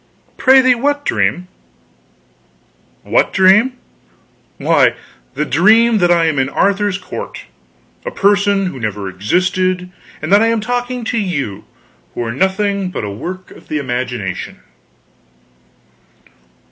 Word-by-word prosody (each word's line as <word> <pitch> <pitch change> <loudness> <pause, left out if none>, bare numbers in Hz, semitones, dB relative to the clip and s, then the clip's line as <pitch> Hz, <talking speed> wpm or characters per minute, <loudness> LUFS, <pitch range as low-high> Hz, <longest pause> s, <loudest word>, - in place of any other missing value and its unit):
"Prithee 260 -1 +5
what 285 +4 -1
dream?" 105 - 0 1.6
"What - - +1
dream? 195 +7 +4 0.8
Why, - - +3 0.4
the 150 - -1
dream 220 +8 +4
that 175 -1 +3
I 170 -1 +3
am 155 -4 0
in 135 0 0
Arthur's 200 +4 +1
court 185 - -8 0.6
a - - -3
person 200 - +2
who 160 -8 -5
never 105 -3 -4
existed; 180 - -1 0.3
and 155 +5 -2
that 205 - +6
I 225 - +3
am 230 -1 +1
talking 245 +2 -3
to 230 +1 -1
you, 140 - -3 0.5
who - - -2
are 115 - -3
nothing 190 - 0
but 180 - -5
a 105 - -4
work 185 - -7
of - - -15
the 155 - -2
imagination." 125 -6 -4
185 Hz, 125 wpm, -16 LUFS, 140-215 Hz, 1.6 s, that